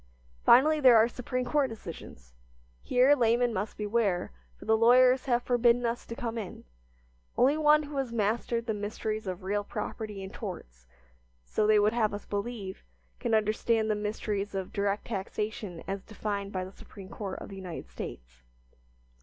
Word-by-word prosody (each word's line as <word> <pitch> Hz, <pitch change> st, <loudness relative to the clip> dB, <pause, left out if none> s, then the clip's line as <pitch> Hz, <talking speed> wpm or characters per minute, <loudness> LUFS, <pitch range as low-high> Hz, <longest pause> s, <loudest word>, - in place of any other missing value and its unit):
Finally, 305 Hz, +5 st, +6 dB
there 255 Hz, -5 st, +7 dB
are 220 Hz, +1 st, +6 dB
Supreme 250 Hz, +1 st, -3 dB
Court 285 Hz, 0 st, +1 dB
decisions. 165 Hz, -, -10 dB, 0.5 s
Here 255 Hz, +3 st, +4 dB
laymen 240 Hz, -1 st, +2 dB
must 205 Hz, +2 st, -3 dB
beware, 210 Hz, -, 0 dB, 0.3 s
for -, -, -12 dB
the 220 Hz, -, +4 dB
lawyers 250 Hz, +3 st, +5 dB
have 245 Hz, -2 st, +1 dB
forbidden 245 Hz, 0 st, +3 dB
us 235 Hz, +1 st, -2 dB
to 230 Hz, -, -6 dB
come 230 Hz, -1 st, -3 dB
in; 195 Hz, -5 st, -7 dB, 0.7 s
only 275 Hz, +4 st, +4 dB
one 305 Hz, 0 st, +4 dB
who 290 Hz, -1 st, -7 dB
has 265 Hz, -3 st, -1 dB
mastered 230 Hz, +1 st, 0 dB
the 225 Hz, -, -1 dB
mysteries 215 Hz, 0 st, -4 dB
of 185 Hz, -1 st, -4 dB
real 205 Hz, +2 st, -1 dB
property 210 Hz, -1 st, -5 dB
and 190 Hz, -, -8 dB
torts, -, -, -8 dB, 0.6 s
so 210 Hz, -, 0 dB
they 215 Hz, 0 st, +5 dB
would 210 Hz, +1 st, +3 dB
have 215 Hz, -3 st, +1 dB
us 205 Hz, -, -8 dB
believe, 205 Hz, -2 st, -4 dB, 0.4 s
can 225 Hz, -, +1 dB
understand 220 Hz, +1 st, +1 dB
the -, -, +1 dB
mysteries 210 Hz, -1 st, -3 dB
of 190 Hz, -1 st, -4 dB
direct 200 Hz, 0 st, -1 dB
taxation 205 Hz, -3 st, -4 dB
as 195 Hz, 0 st, -3 dB
defined 200 Hz, -1 st, -4 dB
by 185 Hz, -2 st, -3 dB
the 190 Hz, -, -10 dB
Supreme 195 Hz, -1 st, -13 dB
Court 195 Hz, -2 st, -5 dB
of -, -, -8 dB
the 195 Hz, -, -8 dB
United 180 Hz, -, -7 dB
States. -, -, -9 dB
215 Hz, 170 wpm, -29 LUFS, 200-240 Hz, 0.7 s, there